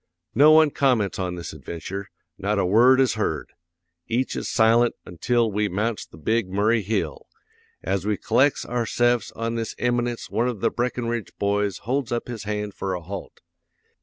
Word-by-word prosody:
"'No 145 +6 +6
one 155 -1 +6
comments 120 -10 +1
on 90 -1 -2
this 85 -2 -7
adventure, 85 +7 -6 0.3
not 100 +2 -1
a 100 - +2
word 120 +8 +5
is 130 -4 +3
heard. - - -2 0.6
Each 125 +3 -1
is - - -3
silent 115 +1 +4
ontil 115 +6 0
we 105 0 +1
mounts 105 +4 -2
the - - -15
Big 110 +5 0
Murray 105 +4 +2
hill. 95 -7 -3 0.6
As 95 0 -1
we 105 0 0
collects 140 +2 +2
ourse'fs 120 0 +1
on 115 0 -2
this 115 -1 -3
eminence 120 -1 -1
one 115 +4 0
of 120 -5 -3
the - - +1
Brackenridge 120 -2 -3
boys 100 -1 0
holds 130 0 -1
up 120 0 -2
his 115 -4 -6
hand 105 -1 -3
for 95 -1 -3
a 90 - -5
halt. 95 +3 -8
110 Hz, 170 wpm, -24 LUFS, 100-120 Hz, 0.6 s, No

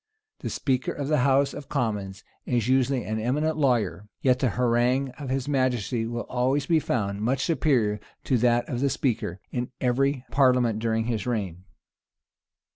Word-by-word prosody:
The - - -4
speaker 130 -2 -1
of 140 -1 -4
the 150 - +3
house 135 +2 +3
of 140 - -9
commons 100 -5 -2 0.2
is 120 -3 0
usually 130 -1 +2
an 110 +1 -3
eminent 150 +8 0
lawyer; 110 - 0
yet 125 -1 +2
the 130 - +2
harangue 125 +3 +1
of 140 -3 -5
his 130 0 -1
majesty 125 -4 0
will 120 0 -3
always 130 +3 0
be 165 -2 +3
found 100 -8 -2
much 130 +5 0
superior 125 -11 +1 0.2
to 130 -3 +1
that 120 0 +2
of 120 - -3
the 140 +1 +2
speaker, 115 -9 -1
in 125 0 -2
every 135 +1 +1
parliament 125 -4 +3
during 115 0 0
this 115 0 -2
reign. 95 -7 -3
125 Hz, 165 wpm, -26 LUFS, 115-135 Hz, 0.2 s, the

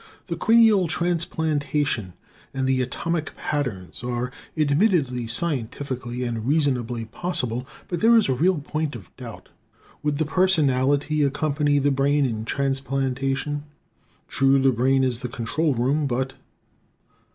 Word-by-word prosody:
The - - -3
cranial 225 -5 +5
transplantation 150 - -1 0.4
and 130 0 0
the 130 -1 +2
"atomic 160 +6 -3
patterns" 120 - -3
are 125 0 -2 0.3
admittedly 145 - +2
scientifically 125 -2 -2
and 115 -2 -3
reasonably 125 -6 0
possible. 125 -2 -2 0.2
But 175 -2 -3
there 230 +1 +6
is 220 - +3
a 130 - +2
real 175 +7 +2
point 150 -1 -3
of 100 -7 -12
doubt: - - -10 0.5
Would 150 -1 0
the 155 - +1
personality 150 -4 +2
accompany 145 +1 +1
the 140 0 +2
brain 140 +1 +2
in 110 -3 -3
transplantation? 135 +2 -1 0.6
True, 135 0 +3
the 135 0 +4
brain 130 +3 +2
is 125 -2 0
the 125 - -4
control 135 +6 -1
room; 140 +5 +1
but 130 +1 -1
135 Hz, 130 wpm, -24 LUFS, 125-155 Hz, 0.6 s, there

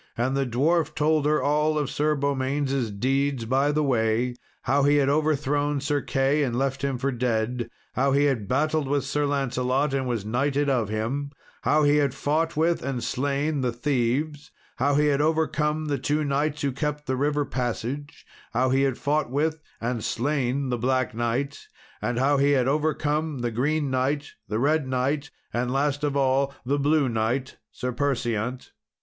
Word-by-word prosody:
And 130 +3 0
the 135 -1 0
dwarf 155 +6 +1
told 155 -1 +2
her 150 0 +2
of - - -2
all 150 +1 +2
Sir 150 +2 0
Beaumains' 135 -2 0
deeds 135 +4 0
by 135 +5 +2
the 150 +1 +1
way: 120 -1 +1 0.3
how 140 +3 +2
he 145 +1 +4
had 140 -2 +3
overthrown 145 -1 +1
Sir 145 +1 0
Key, 135 +2 +1
and 125 -4 0
left 135 +1 -1
him 135 -2 0
for 140 +2 -1
dead; 120 -1 -1 0.2
how 135 +2 +2
he 140 +1 +3
had 130 -8 +1
battled 150 +2 +1
with 140 0 +1
Sir 145 +1 0
Lancelot, 135 0 0
and 135 -1 0
was 115 -5 -2
knighted 140 +5 +1
of 120 -6 0
him; 120 +7 -2 0.3
how 150 0 +3
he 145 0 +4
had 140 -3 +1
fought 155 +3 0
with, 165 +2 +2
and 130 -2 -3
slain, 140 +2 -1
the 125 -1 0
thieves; 140 +4 -1 0.3
how 140 +2 +2
he 150 +1 +3
had 145 -1 +2
overcome 155 0 +1
the 145 -3 -1
two 150 +4 0
knights 145 +1 -1
who 140 - +1
kept 150 +2 -3
the 130 -2 -1
river 145 +2 0
passage; 130 +3 -4 0.3
how 130 +2 +2
he 135 +1 +3
had 135 -2 +1
fought 150 -1 0
with, 155 +4 0 0.2
and 120 -1 -2
slain, 135 0 -1
the 125 -1 -1
Black 130 0 0
Knight; 120 +5 -2 0.3
and 120 -1 -1
how 140 +3 +3
he 140 +1 +3
had 130 -2 +2
overcome 150 0 0
the 120 -1 -1
Green 145 +4 0
Knight, 140 +3 0 0.2
the 105 +2 -2
Red 145 +3 +2
Knight, 135 +3 -1 0.2
and 125 +1 -1
last 145 +2 0
of 145 -1 0
all, 135 0 +2
the 140 +3 +1
Blue 145 0 +3
Knight, 120 +3 -1
Sir 125 - -3
Perseant. 125 -3 -2
140 Hz, 180 wpm, -25 LUFS, 125-145 Hz, 0.3 s, he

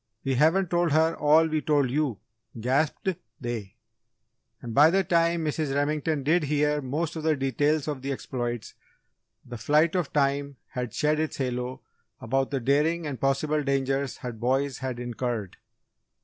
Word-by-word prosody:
We 135 - 0
haven't 160 +7 +3
told 175 -3 +2
her 160 +1 +3
all 155 +2 +5
we 155 -1 -1
told 145 -3 +2
you!" 140 -6 0 0.4
gasped 140 - 0 0.3
they. 115 -4 -5 0.8
And 120 -2 -7
by 150 +5 +7
the 195 +3 +2
time 170 -1 +2
Mrs. 150 -2 -1
Remington 150 0 0
did 160 +3 +2
hear 150 0 +1
most 155 +5 -2
of 160 - -4
the 155 0 +2
details 145 +3 0
of 145 -4 -3
the 135 +1 -3
exploits, 120 -3 -4 0.7
the 120 -2 -8
flight 150 +7 +3
of 180 -6 -1
time 140 0 0
had 125 -2 -4
shed 150 +1 +1
its 160 -1 -2
halo 125 -1 -3 0.4
about 135 +3 0
the 140 - -1
daring 150 +6 +1
and 140 -4 -5
possible 145 +3 +1
dangers 135 -1 -1
her 125 - -5
boys 130 +4 -1
had 130 -2 -4
incurred. 120 -4 -4
140 Hz, 160 wpm, -26 LUFS, 130-155 Hz, 0.8 s, by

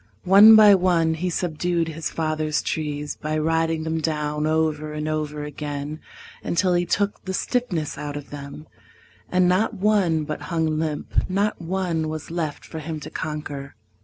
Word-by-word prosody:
One 205 +4 +9
by 210 -2 +9
one 175 -4 +3
he 175 +3 -2
subdued 170 0 -1
his 160 0 -4
father's 155 -1 -1
trees 150 -2 -3
By 155 +1 -2
riding 160 0 0
them 160 0 -2
down 150 -1 -1
over 155 -1 0
and 150 0 -3
over 150 -1 -2
again 150 +1 -5 0.4
Until 180 +1 +1
he 175 0 +1
took 205 0 0
the 190 0 -2
stiffness 180 - -2
out 145 -1 -4
of 145 - -10
them, 145 +1 -8 0.7
And 185 0 +3
not 190 +5 +2
one 190 -6 +2
but 150 0 -5
hung 160 -2 0
limp, 155 +2 -2
not 200 +1 0
one 170 -2 -1
was 155 0 -6
left 160 -4 -3
For 160 - -7
him 155 0 -5
to - - -8
conquer. 145 -3 -5
160 Hz, 160 wpm, -23 LUFS, 150-180 Hz, 0.7 s, One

